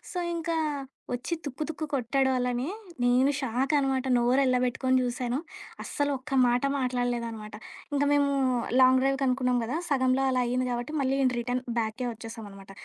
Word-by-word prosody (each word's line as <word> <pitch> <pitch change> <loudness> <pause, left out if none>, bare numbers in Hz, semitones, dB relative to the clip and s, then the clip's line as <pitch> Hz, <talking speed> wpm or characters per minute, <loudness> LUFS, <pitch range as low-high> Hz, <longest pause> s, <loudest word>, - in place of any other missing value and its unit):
So, 360 - -4 0.2
ఇంకా 330 0 -2 0.6
ఒచ్చి 245 +8 -2
తుక్కు, 285 +1 -5
తుక్కు 315 0 -4
కొట్టాడు 265 +1 +1
వాళ్ళనీ, 250 0 -1 0.4
నేను 250 +3 +4
షాకనమాట, 270 +1 0
నోరెళ్ళబెట్టుకోని 255 +1 +2
చూశాను. 245 +1 -2 0.5
అస్సలు 285 0 -1
ఒక్క 265 +3 -12 0.2
మాట 245 +2 +1
మాట్లాడలేదనమాట. 240 -4 -2 0.4
ఇంక 285 - +2
మేమూ 285 -1 +3 0.5
లాంగ్ 255 0 +6
డ్రైవ్‌కనుకున్నాం 260 -2 +1
గదా! 250 +7 -2
సగంలో 260 -1 +2
అలా 255 -1 +1
అయింది 255 +1 0
గాబట్టి, 245 +5 -3
మళ్ళీ 265 0 +1
ఇన్ 255 - +3
రిటర్న్ 245 +1 -2 0.2
బ్యాక్కే 230 +3 -2
ఒచ్చేశామనమాట. 215 -3 -10
255 Hz, 135 wpm, -28 LUFS, 245-270 Hz, 0.6 s, లాంగ్